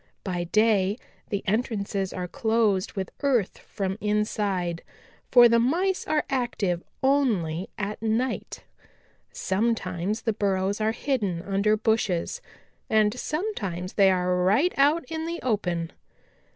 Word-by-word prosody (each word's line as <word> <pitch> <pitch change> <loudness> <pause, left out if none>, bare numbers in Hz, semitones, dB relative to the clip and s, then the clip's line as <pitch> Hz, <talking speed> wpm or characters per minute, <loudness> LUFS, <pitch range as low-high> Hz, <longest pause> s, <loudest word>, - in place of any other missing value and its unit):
By 175 -2 -2
day 210 +1 +2 0.3
the 200 -1 -2
entrances 200 -3 -1
are 180 -1 -4
closed 220 -3 +1
with 190 -3 -4
earth 255 -9 +1
from 195 +1 -4
inside, 205 -5 -1 0.5
for 245 -1 +8
the 235 0 +4
Mice 355 +10 +1
are 310 -1 +1
active 225 -9 -1 0.2
only 205 - +1
at 210 +1 -4
night. 225 +3 -2 0.7
Sometimes 200 -1 -1
the 225 - +1
burrows 200 0 0
are 215 +1 +2
hidden 215 -9 -2
under 200 +2 +1
bushes, 220 - 0 0.5
and 215 -1 +3
sometimes 240 - -3
they 195 -2 +5
are 180 -1 +1
right 225 - +3
out 290 +3 +3
in 320 +4 -4
the 340 +1 -3
open. 175 -8 -1
210 Hz, 125 wpm, -26 LUFS, 190-240 Hz, 0.7 s, for